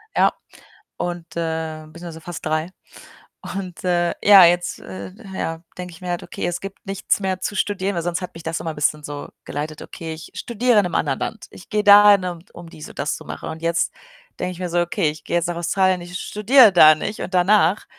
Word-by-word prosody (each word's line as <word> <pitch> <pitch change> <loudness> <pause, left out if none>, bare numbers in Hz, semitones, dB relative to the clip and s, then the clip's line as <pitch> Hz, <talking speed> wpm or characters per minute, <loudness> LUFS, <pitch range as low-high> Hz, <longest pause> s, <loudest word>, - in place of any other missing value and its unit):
Ja - - +4 0.6
und, 175 -2 -5
äh, 160 -1 -3
beziehungsweise 165 0 -10
fast 175 -1 -8
3, 155 +2 -1 0.9
und, 185 -3 -6
äh, 175 -1 +1
ja, 200 -3 +9
jetzt, 175 +1 +1
äh 95 0 -9 0.2
ja 165 -3 -4
denke 180 -1 -7
ich 165 - -15
mir 180 - -6
halt: 175 -1 -2
„Okay, - - -5
es 175 0 -2
gibt 195 0 -9
nichts 195 0 -1
mehr 190 -1 -1
zu 205 - -3
studieren,“ 200 -1 -1
weil 170 - -1
sonst 175 +1 -2
hat 180 - -6
mich 165 - -11
das 165 +1 -3
immer 165 - -4
'n - - -10
bisschen 150 +1 0
so 145 0 -7 0.2
geleitet: 150 +2 -5
„Okay, 160 -1 -7
ich 160 0 -10
studiere 240 -1 +2
in - - +3
'nem 180 - -3
anderen 140 -3 0
Land, 220 - -5
ich - - -14
gehe 210 0 0
dahin, 205 -2 +8
um, 175 -2 -4
um 170 -1 -11
dies 155 -2 -10
und - - -13
das 140 +2 -1
zu - - -10
machen.“ - - -7
Und 160 0 -7
jetzt 170 +1 0 0.5
denke 180 - -2
ich 180 - -10
mir 180 -1 -3
so: 175 +1 +1
„Okay, 175 -1 0
ich 150 +1 -9
gehe 175 - 0
jetzt 170 - 0
nach 175 - -3
Australien, 185 +1 +1
ich 175 +1 -7
studiere 220 +1 +5
da 155 -3 +8
nicht“ 205 +7 -5
und 185 - -6
danach, 185 +1 +3
175 Hz, 225 wpm, -21 LUFS, 160-190 Hz, 0.9 s, ja